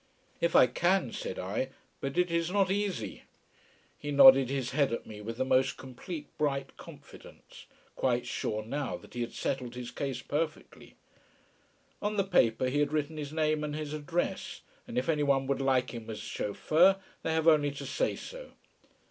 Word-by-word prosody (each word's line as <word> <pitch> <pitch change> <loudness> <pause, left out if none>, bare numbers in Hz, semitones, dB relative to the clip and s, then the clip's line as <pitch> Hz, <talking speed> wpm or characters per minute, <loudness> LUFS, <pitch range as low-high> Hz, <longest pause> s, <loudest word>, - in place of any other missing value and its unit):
"If 170 0 +1
I - - +9
can," 175 +2 +1
said - - -5
I. 105 +8 -2 0.3
"But 135 +4 -4
it 180 -1 +2
is 170 0 +1
not 195 0 +2
easy." 195 - -2 0.8
He 145 - -5
nodded 135 -2 +8
his 135 -2 -2
head 140 -1 +2
at 115 - -3
me 105 -1 -9
with 115 +2 -6
the 130 - 0
most 130 0 +2
complete 145 +5 -7
bright 140 -2 -1
confidence, - - -14 0.3
quite 125 -1 0
sure 110 -3 -3
now 140 +4 -3
that - - -16
he 120 - -3
had 120 - -4
settled 125 -3 -3
his 125 -1 -6
case 130 -1 -4
perfectly. 155 +1 -4 1.1
On 210 +1 -1
the 195 - +3
paper 130 - +2
he 140 +3 0
had 145 0 +1
written 155 0 -1
his 145 -1 -5
name 155 -1 +1
and 150 0 -3
his 155 -1 -4
address, 160 +3 -3 0.3
and 240 0 -6
if 250 - 0
anyone 140 -4 +2
would 140 0 -1
like 130 -2 +1
him 115 -1 -7
as 110 - -5
chauffeur 165 - +2 0.2
they 160 - -1
have 160 0 +1
only 150 -3 +5
to 140 - -7
say - - 0
so. - - -9
145 Hz, 180 wpm, -30 LUFS, 125-160 Hz, 1.1 s, I